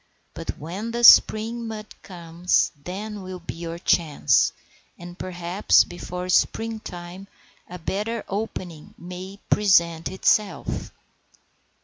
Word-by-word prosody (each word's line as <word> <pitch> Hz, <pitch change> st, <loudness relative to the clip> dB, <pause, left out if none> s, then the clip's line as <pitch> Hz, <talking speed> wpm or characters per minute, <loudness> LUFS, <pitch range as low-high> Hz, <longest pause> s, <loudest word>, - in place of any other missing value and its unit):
But -, -, -6 dB
when 185 Hz, +9 st, -6 dB
the 235 Hz, +1 st, -3 dB
spring 230 Hz, 0 st, +6 dB
mud 215 Hz, -1 st, -6 dB, 0.2 s
comes 175 Hz, -1 st, 0 dB
then 200 Hz, +8 st, -7 dB
will 185 Hz, 0 st, -7 dB
be 170 Hz, -, -7 dB
your 165 Hz, 0 st, -6 dB
chance, 155 Hz, -, +2 dB, 0.5 s
and 175 Hz, 0 st, -10 dB
perhaps 180 Hz, +2 st, +2 dB
before 180 Hz, +1 st, -7 dB
spring 225 Hz, +4 st, +1 dB
time 180 Hz, 0 st, -9 dB, 0.4 s
a 180 Hz, -, -7 dB
better 210 Hz, +6 st, -3 dB
opening 185 Hz, -6 st, -6 dB
may 180 Hz, +3 st, -9 dB
present 170 Hz, -5 st, +3 dB
itself." 195 Hz, +2 st, 0 dB
185 Hz, 110 wpm, -24 LUFS, 175-210 Hz, 0.5 s, spring